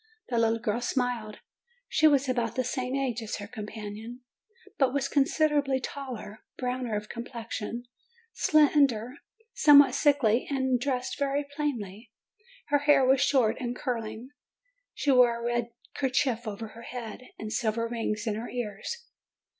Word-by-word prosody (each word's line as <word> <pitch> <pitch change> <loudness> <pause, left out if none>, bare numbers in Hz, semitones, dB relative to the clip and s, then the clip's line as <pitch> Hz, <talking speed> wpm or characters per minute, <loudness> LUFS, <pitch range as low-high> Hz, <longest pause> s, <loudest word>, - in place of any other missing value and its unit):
The 235 -2 +1
little 225 0 +3
girl 230 0 -2
smiled. 245 -4 -2 0.5
She 315 - +4
was 280 -2 +3
about 240 -3 -1
the 255 - +1
same 255 +1 -2
age 260 -4 -1
as 220 - -4
her 205 - -6
companion, 215 +2 -8 0.6
but 265 -1 +3
was 280 -1 +1
considerably 290 -2 +2
taller, 255 -5 -7 0.2
brown 250 0 -2
of 210 0 -2
complexion, 235 -1 -5 0.5
slender, 280 -5 +3 0.4
somewhat 285 - +7
sickly, 255 -6 +3
and 260 -3 +1
dressed 250 0 -2
very 280 +1 0
plainly. 230 -7 -4 0.6
Her 290 - +4
hair 285 -2 +4
was 265 +1 +4
short 240 -5 +3
and 245 -2 -3
curling, 230 -1 -4 0.6
she 285 - +1
wore 245 -2 +5
a 235 - -5
red 240 0 0 0.2
kerchief 255 -3 0
over 215 +1 -5
her 230 - -12
head, 235 -1 -7 0.2
and 215 0 -5
silver 230 0 0
rings 225 -2 -2
in 220 - 0
her 225 +3 -5
ears. 245 - -5
245 Hz, 145 wpm, -28 LUFS, 225-275 Hz, 0.6 s, somewhat